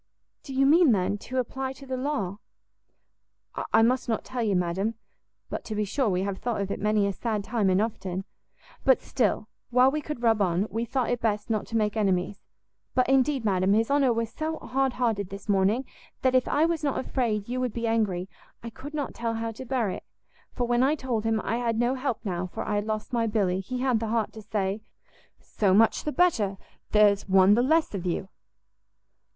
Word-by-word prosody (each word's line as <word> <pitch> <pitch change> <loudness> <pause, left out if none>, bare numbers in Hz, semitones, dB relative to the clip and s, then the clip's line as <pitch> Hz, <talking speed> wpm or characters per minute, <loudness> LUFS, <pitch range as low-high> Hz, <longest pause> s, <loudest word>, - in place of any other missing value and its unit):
"Do 270 - -8
you 270 +1 +4
mean, 305 -2 +6
then, 200 +1 0
to 255 +4 -6
apply 265 +1 -2
to 275 +1 -13
the 260 -1 -3
law?" 235 -8 -2 1.3
"I 225 - +5
must 250 +2 +1
not 225 - -1
tell 255 -1 -4
you, 210 -4 +1
madam; 180 +5 0 0.5
but - - -5
to 215 - -4
be 210 0 0
sure 230 +4 0
we 185 0 0
have 195 -1 -3
thought 240 -3 -2
of 200 0 -2
it - - -3
many 210 -1 +2
a 200 - 0
sad 215 -1 -2
time 215 -2 0
and 185 0 +3
often; 195 -4 -3 0.6
but 265 -2 +5
still, 215 -3 -1 0.2
while 250 +2 +5
we 305 +1 -2
could 295 -5 -6
rub 225 -2 +3
on, 180 +1 +2
we 230 +1 -1
thought 250 +1 -1
it 245 - -1
best 210 0 -1
not 215 -2 -1
to 230 - -1
make 210 -1 0
enemies: 195 -2 0 0.5
but, 255 -1 +3
indeed, 270 -1 +2
madam, 190 -1 +2
his 225 +4 +2
honour 280 -3 +4
was 230 -1 -1
so 315 +3 -3
hardhearted 245 -8 -1
this 200 +1 -9
morning, 205 +6 +2 0.4
that 260 -1 +3
if 255 -1 +3
I 305 - +3
was 330 -2 -1
not 280 -2 0
afraid 225 -6 -1
you 250 +1 -2
would 250 -2 -1
be 235 0 -3
angry, 210 -6 0 0.4
I 230 - -6
could 285 +7 -9
not 290 -3 -3
tell 230 -1 -2
how 225 0 -3
to 240 +4 -9
bear 240 -6 0
it; - - -6 0.5
for 245 - -2
when 240 0 +2
I 275 +4 +3
told 245 -6 -2
him 225 -1 +1
I 230 - -1
had 235 -2 -1
no 240 +2 +2
help 255 -3 -3
now, 180 -2 -2
for - - -5
I - - -1
had 205 0 0
lost 215 +2 -3
my 230 -1 +1
Billy, 195 -4 +1
he 250 +6 -4
had 255 -4 +2
the 225 - -3
heart 220 -1 -1
to 220 - -9
say, 205 -1 -2 0.6
'So 195 -3 +1
much 225 +2 +3
the 300 - 0
better, 225 - +2 0.3
there's 205 -2 +4
one 190 +1 +6
the 235 - +4
less 315 +3 +2
of 185 -2 -3
you.'" 185 +2 -2
225 Hz, 215 wpm, -27 LUFS, 200-255 Hz, 1.3 s, mean